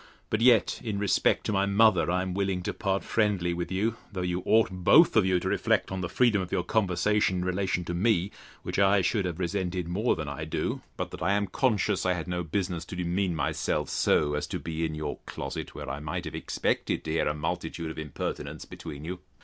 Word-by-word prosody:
But 110 - +1
yet, 120 -3 +4
in 110 -4 -2
respect 100 -2 +2
to - - 0
my 100 0 +2
mother, 100 -4 +4
I 90 +1 +1
am 95 -1 -3
willing 95 -1 -1
to - - -2
part 95 -1 -1
friendly 100 -6 +1
with 85 0 -4
you 110 +5 0
though 95 -3 -3
you 90 0 -1
ought 110 -2 +4
both 95 - +5
of 105 -4 +5
you 90 -1 +3
to - - -4
reflect - - +1
on 95 -1 -3
the 90 - -3
freedom 115 -5 +3
of 90 - -6
your 90 - 0
conversation, 105 0 +1
in 90 - -2
relation 90 -1 -1
to 85 - -3
me; 95 0 +2 0.3
which - - -2
I 100 0 +5
should 100 +2 +1
have 85 -3 -3
resented 90 -1 -2
more 105 +8 +1
than 75 -2 -5
I 70 +2 -5
do, 80 - -2 0.2
but - - -3
that - - -8
I 100 - +2
am 100 0 +1
conscious 105 -4 +1
I 90 - +2
had 90 -1 -4
no 90 0 -2
business 90 0 -2
to - - -7
demean 90 0 0
myself 80 - -1
so 75 -1 +2
as 75 - -2
to - - -3
be 80 0 -4
in 80 -1 -3
your 75 -1 -4
closet, - - -5
where - - -6
I 70 +2 -4
might 75 0 -4
have - - -6
expected - - -1
to 80 - -4
hear 80 - +1
a 75 - 0
multitude 80 +1 -3
of 80 - -7
impertinence 75 -3 -5
between 75 -2 -8
you. 90 +2 -5
90 Hz, 230 wpm, -28 LUFS, 85-100 Hz, 0.3 s, both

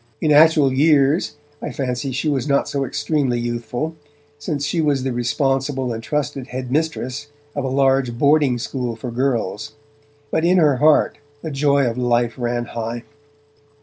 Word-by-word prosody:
In 155 - +1
actual 150 -2 +5
years 145 +2 +3 0.3
I - - -4
fancy 130 0 -3
she 140 +5 -2
was 140 -2 0
not 140 - +2
so 140 -1 -2
extremely 135 -2 -1
youthful, 120 +6 -3 0.4
since 145 -1 -3
she 165 +3 0
was 145 -4 +1
the 130 -1 -2
responsible 135 +1 -1
and 115 - -5
trusted 145 0 -3
headmistress 135 +1 -3 0.3
of 145 -2 -2
a - - -1
large 135 -2 +1
boarding 145 -2 +3
school 120 -1 -4
for 120 +2 -6
girls, 120 -5 -2 0.6
but 160 - 0
in 180 +2 +4
her 150 -6 +4
heart 150 +2 +3 0.2
the 160 - -4
joy 140 -1 +2
of 120 +1 -3
life 120 -1 +1
ran 120 0 -1
high. 115 +1 -5
135 Hz, 155 wpm, -20 LUFS, 120-145 Hz, 0.6 s, actual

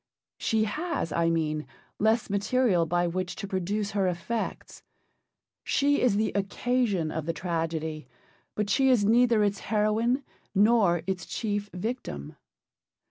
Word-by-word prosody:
She 220 -1 +1
has, 300 - -2
I 165 +1 +2
mean, 155 -2 -1 0.3
less 220 +2 +2
material 200 -3 +2
by 175 +2 +1
which 175 +1 -2
to 200 - -6
produce 200 +2 -2
her 195 -2 +1
effects. 180 +6 -4 0.8
She 285 +1 +2
is 240 -5 +3
the 215 +1 +1
occasion 200 -3 0
of 160 -1 -4
the 165 - 0
tragedy, 160 -4 -3 0.5
but 210 -1 -1
she 265 +7 +3
is 235 -6 +4
neither 230 0 +4
its 200 -1 0
heroine 220 +5 +1 0.3
nor 200 -5 +4
its 185 -2 -3
chief 205 -2 -2
victim. 180 - -5
200 Hz, 135 wpm, -27 LUFS, 175-225 Hz, 0.8 s, is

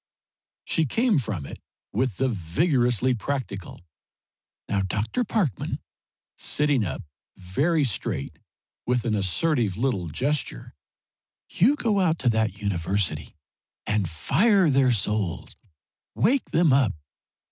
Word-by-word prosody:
She 160 -2 0
came 225 - +2
from 100 - -4
it - - -9 0.3
with 120 -2 0
the 135 - +1
vigorously 125 - +1
practical, 110 -8 -5 0.8
"Now, 100 - 0
Dr. 105 - -1
Parkman," 195 - -1 0.6
sitting 145 -5 +1
up 95 - -4 0.3
very 145 - +1
straight, 100 - -3 0.5
with 125 0 +1
an 115 - +1
assertive 105 - +1
little 115 -8 0
gesture 130 - -2 0.8
"you 250 - +4
go 220 -8 +1
out 165 -3 +2
to 125 - +1
that 110 -3 0
university 95 -5 -1 0.5
and 105 -5 0
fire 190 - +3
their 135 -1 +4
souls! 105 -4 -1 0.6
Wake 255 +8 +2
them 165 -4 +3
up! 130 -6 +3
120 Hz, 115 wpm, -25 LUFS, 100-150 Hz, 0.8 s, you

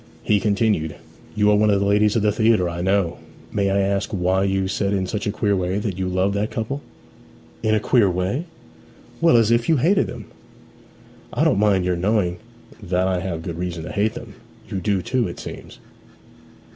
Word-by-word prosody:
He 105 - +2
continued, 100 -7 0 0.4
'You 105 0 +3
are - - +5
one 105 +1 +3
of 100 -1 +3
the 100 - 0
ladies 105 +2 +3
of 110 - +1
the 105 - +3
theatre, 110 -3 +2
I 85 0 -4
know. 95 -2 0 0.3
May 100 -2 0
I 100 +1 +2
ask 100 0 0
why 95 0 +1
you 95 -1 0
said 100 +1 -1
in 95 -1 0
such 105 +2 -3
a - - +1
queer 100 -1 0
way 95 +1 -1
that 100 -3 -3
you 95 - -1
loved 95 +2 +1
that 105 +1 -1
couple?' 135 +6 -4 0.8
'In 110 0 +2
a - - +2
queer 110 -2 +3
way?' 95 - -2 0.8
'Well, 165 -7 +5
as 115 -1 +3
if 115 +3 +2
you 160 - +4
hated 185 +10 +2
them.' - - -8 1.1
'I - - +1
don't - - +3
mind 100 -3 +3
your 90 -1 +1
knowing 95 -1 0 0.4
that 90 -1 0
I 95 -1 0
have 85 -3 -4
good 85 0 -5
reason 90 -2 -4
to - - -7
hate 105 +2 0
them. - - -9 0.3
You 100 -2 -3
do 95 -1 0
too, 125 -3 0
it - - -8
seems?' - - -9
100 Hz, 205 wpm, -22 LUFS, 95-105 Hz, 1.1 s, are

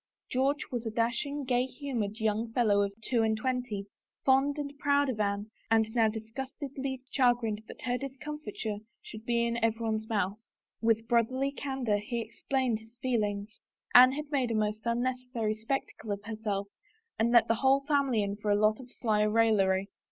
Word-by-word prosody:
George^was 265 -1 0
a - - 0
dashing, 240 +6 -1
gay 250 0 +2
humored 240 -7 -4
young 220 +1 0
fellow 210 -5 +3
of 200 0 0
two 240 -1 +1
and 220 -1 +2
twenty, 245 -4 -2 0.4
fond 270 +2 +4
and 285 -1 -4
proud 285 -1 +3
of 230 -4 -3
Anne 205 +1 -1 0.2
and 220 -1 +3
now 230 -2 +4
dis 220 0 -5
gustedly 270 0 -5
chagrined 240 -5 +2
that - - -11
her 245 0 0
discomfiture 275 -6 -5 0.3
should 220 -1 -9
be 235 0 +2
in 235 -1 -1
everyone's 220 -1 0
mouth. 205 -1 0 0.4
With 225 0 +2
brotherly 255 +4 +2
candor 265 -7 -1
he 235 +3 -3
explained 235 +1 -1
his 225 +1 -19
feelings. 210 -4 -1 0.3
Anne 255 +1 +9
had 300 +1 -5
made 265 -4 +1
a 230 - 0
most 215 +1 -1
unnecessary 245 -2 -1
spec 225 +6 -1
tacle 220 - -9
of 200 0 -7
herself 215 -2 -3 0.5
and 225 +1 +3
let 235 -1 +6
the - - +3
whole 270 +1 +5
family 275 -6 +2
in 200 0 -3
for 210 0 -3
a 205 - +5
lot 215 +1 +3
of 255 -1 -11
sly 215 -2 +1
raillery. 210 -3 +3
230 Hz, 175 wpm, -30 LUFS, 215-260 Hz, 0.5 s, Anne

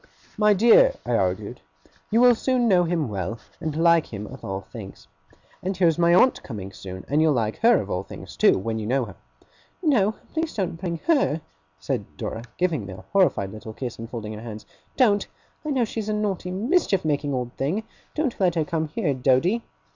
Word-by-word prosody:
'My 210 -1 +4
dear,' 240 - +6
I - - -2
argued, - - -1 0.5
'you 225 +2 +3
will 245 0 +8
soon 245 +1 +1
know 180 -4 +4
him 165 -4 0
well, 100 +1 -3 0.2
and 155 -3 -3
like 170 0 +4
him 105 -1 -5
of 130 +5 -11
all 95 0 -4
things. 100 0 -11 0.5
And 190 0 -3
here 180 -2 +4
is 165 +1 +1
my 170 0 +4
aunt 215 +9 +5
coming 100 -5 -7
soon; 95 -1 -8
and 145 +3 +2
you'll 160 -1 +4
like 110 -4 -1
her 235 +2 +5
of 100 - -4
all 90 - 0
things - - -10
too, - - +5
when 110 +4 -2
you 105 - -4
know 130 +1 +1
her.' 105 - -11 0.7
'No, 220 - +3 0.2
please 320 0 -2
don't 180 -5 -2
bring 170 -2 -3
her!' 275 - +2 0.4
said 75 - -4
Dora, 110 - -4 0.2
giving 160 - 0
me 95 - -7
a 95 - -12
horrified 180 - +3
little 110 0 -8
kiss, 120 0 -6
and 115 0 -7
folding 110 -3 -5
her 105 - -8
hands. 110 -2 -8 0.3
'Don't. 205 -6 +3 0.4
I 305 - -4
know 260 -5 +2
she's 215 -1 -4
a - - +1
naughty, 205 -4 -2
mischief 205 - +1
making 145 -2 0
old 125 -1 -3
thing! 165 +11 -1 0.3
Don't 300 -6 -1
let 180 -3 +2
her 160 -2 +1
come 160 -1 -1
here, 150 -1 -1
Doady! 135 - +2
165 Hz, 205 wpm, -24 LUFS, -, 0.7 s, will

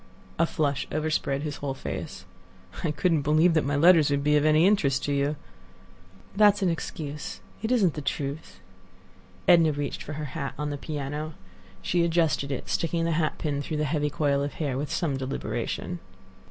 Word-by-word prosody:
A 165 - +4
flush 145 -4 -1
overspread 150 -2 -1
his 150 -2 -4
whole 140 -2 -3
face. - - -6 0.6
"I - - +1
couldn't 155 +2 +1
believe 155 +4 +4
that 155 - +3
my 145 +1 -1
letters 160 0 +6
would 140 0 0
be 150 0 +3
of 145 - +3
any 155 +2 +5
interest 145 -10 +2
to 145 - 0
you." 140 +2 +1 1.0
"That 205 -1 +6
is 205 - -7
an 185 - +3
excuse; 150 -3 -5 0.2
it 225 +2 -2
isn't 200 -10 +3
the 150 - -5
truth." 140 +2 -4 0.9
Edna 165 -3 +6
reached 145 0 -4
for 150 - -6
her 150 0 -4
hat 140 -4 -4
on 150 0 -2
the 145 - -3
piano. 150 +1 -4 0.5
She 175 -1 +2
adjusted 165 -4 +1
it, 135 - -4
sticking 165 0 0
the 165 - 0
hat 155 -1 0
pin 145 -2 -2
through 150 +2 -3
the 150 - 0
heavy 150 0 0
coil 140 -1 +1
of 140 0 -3
hair 145 -5 -2
with 145 +3 -3
some 150 -7 0
deliberation. 135 +1 -3
150 Hz, 185 wpm, -27 LUFS, 140-165 Hz, 1.0 s, letters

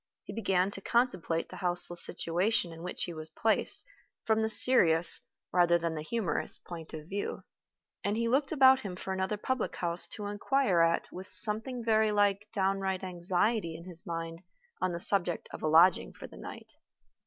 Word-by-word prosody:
He - - -11
began 195 -3 -2
to 195 - -8
contemplate 190 -9 -2
the - - -12
houseless 175 -1 +9
situation 175 +1 +1
in 165 - -13
which 180 - -6
he 175 - -6
was 155 0 -4
placed 220 - -3 0.4
from 220 0 0
the 220 - -2
serious 175 -8 +4 0.3
rather 175 -1 +2
than 170 -1 -5
the 155 - -7
humorous 205 +3 +3
point 165 -2 -11
of 155 0 -11
view, 200 +2 -6 0.6
and 205 +2 -3
he 230 0 -2
looked 270 +3 -1
about 265 -3 +4
him 195 -7 -8
for 190 +1 -7
another 190 +2 -4
public 260 +3 -4
house 170 0 -5
to 205 +4 -9
inquire 205 -2 -1
at 165 0 0
with 185 +1 -11
something 230 +3 +1
very 220 -1 +1
like 205 0 -1
downright 195 -2 -3
anxiety 180 0 -3
in 170 - -14
his 175 -2 -6
mind 165 0 -7 0.4
on 185 - -1
the 170 - -6
subject 175 -2 -2
of - - -10
a - - -3
lodging 165 +4 +2
for - - -13
the - - -15
night. - - -12
190 Hz, 180 wpm, -28 LUFS, 170-215 Hz, 0.6 s, houseless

